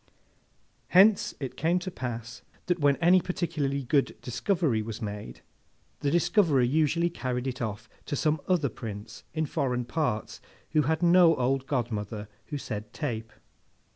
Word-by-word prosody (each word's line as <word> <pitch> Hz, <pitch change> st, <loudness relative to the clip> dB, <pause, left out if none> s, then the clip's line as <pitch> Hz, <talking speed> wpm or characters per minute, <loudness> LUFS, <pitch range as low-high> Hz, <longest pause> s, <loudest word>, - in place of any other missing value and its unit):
Hence 195 Hz, +3 st, +5 dB
it 135 Hz, -3 st, -5 dB
came 170 Hz, +3 st, +1 dB
to 185 Hz, +1 st, -4 dB
pass, 115 Hz, -6 st, -6 dB, 0.2 s
that 180 Hz, -1 st, 0 dB
when 145 Hz, -2 st, +4 dB
any 180 Hz, +3 st, +5 dB
particularly 155 Hz, -6 st, -2 dB
good 140 Hz, +2 st, +1 dB
discovery 130 Hz, -, 0 dB
was 110 Hz, 0 st, -6 dB
made, 105 Hz, -, -6 dB, 0.6 s
the 145 Hz, -, 0 dB
discoverer 170 Hz, -, +3 dB
usually 160 Hz, +6 st, +2 dB
carried 125 Hz, -5 st, -3 dB
it 130 Hz, -1 st, -3 dB
off 105 Hz, -3 st, -4 dB, 0.2 s
to -, -, -1 dB
some 155 Hz, +1 st, +1 dB
other 170 Hz, -7 st, +2 dB
Prince, 105 Hz, -2 st, -8 dB
in 160 Hz, 0 st, +1 dB
foreign 125 Hz, -3 st, -1 dB
parts, 120 Hz, -, -2 dB, 0.3 s
who 155 Hz, -, +4 dB
had 160 Hz, +4 st, 0 dB
no 175 Hz, -1 st, +6 dB
old 135 Hz, +1 st, 0 dB
godmother 110 Hz, -5 st, -2 dB, 0.2 s
who 150 Hz, -, -4 dB
said 110 Hz, -6 st, -6 dB
Tape. 115 Hz, -7 st, -4 dB
140 Hz, 145 wpm, -28 LUFS, 120-165 Hz, 0.6 s, no